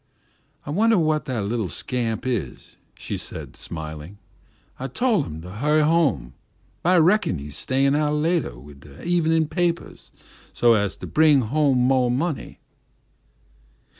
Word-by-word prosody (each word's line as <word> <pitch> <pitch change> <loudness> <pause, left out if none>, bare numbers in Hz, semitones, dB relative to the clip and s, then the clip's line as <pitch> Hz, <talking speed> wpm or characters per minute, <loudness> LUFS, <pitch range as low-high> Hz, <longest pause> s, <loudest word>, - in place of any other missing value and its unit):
"I - - -5
wunner 220 +6 +3
whah 155 -2 +2
that 125 -7 -3
little 105 -2 -2
scamp 115 - -3
is," 115 - -4 0.2
she - - -5
said, - - -8
smiling; 80 +3 -7 0.6
"I 135 - -3
tol' 225 - +1
him 80 - -7
to 90 - -9
hu'y 150 +5 +2
home, 155 - +1 0.5
but 175 - +1
I 185 - +5
reckon 175 - +3
he's 75 +1 -8
stayin' 135 - +1
out 150 0 +1
latah 155 - 0
wid 70 +2 -14
de 70 0 -14
evenin' 165 -2 +2
papahs 170 0 -2 0.4
so's 110 -5 +2
to - - -8
bring 150 -3 +4
home 130 +1 +2
mo' 130 -2 +3
money." 140 +4 -3
135 Hz, 140 wpm, -23 LUFS, 105-160 Hz, 0.6 s, I